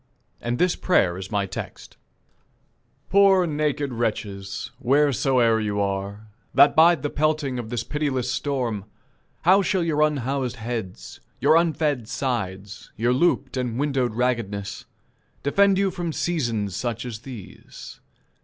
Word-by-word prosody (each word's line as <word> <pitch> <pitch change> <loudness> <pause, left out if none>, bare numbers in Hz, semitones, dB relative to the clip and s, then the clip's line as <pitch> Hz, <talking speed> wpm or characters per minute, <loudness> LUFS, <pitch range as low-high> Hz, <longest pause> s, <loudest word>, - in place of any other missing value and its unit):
And 120 +1 -2
this 180 +3 +2
prayer 95 - +2
is 95 +1 -7
my 100 -2 0
text: 95 - -8 1.2
"Poor 195 -1 +5
naked 150 -3 -1
wretches, 105 -4 -3
wheresoe'er 130 -3 +3
you 105 -1 -2
are, 100 +2 -3 0.3
That 145 - +6
bide 165 -2 +5
the 145 - -2
pelting 150 -4 0
of 115 -2 -6
this 120 -1 -2
pitiless 140 -1 -2
storm, 125 -8 -2 0.6
How 190 +4 +6
shall 190 -2 0
your 155 -3 0
unhoused 135 -4 0
heads, 115 -5 -6 0.2
your - - +4
unfed 155 -7 +1
sides, 105 -6 -4
Your 120 +3 +1
looped 135 -2 +1
and 125 -2 -2
windowed 135 -5 0
raggedness, 115 -5 -2 0.6
defend 195 +7 +3
you 195 -1 +1
From 170 -2 -4
seasons 115 - -1
such 120 -1 -3
as 115 -4 -6
these? 120 -4 -11
125 Hz, 130 wpm, -24 LUFS, 110-150 Hz, 1.2 s, That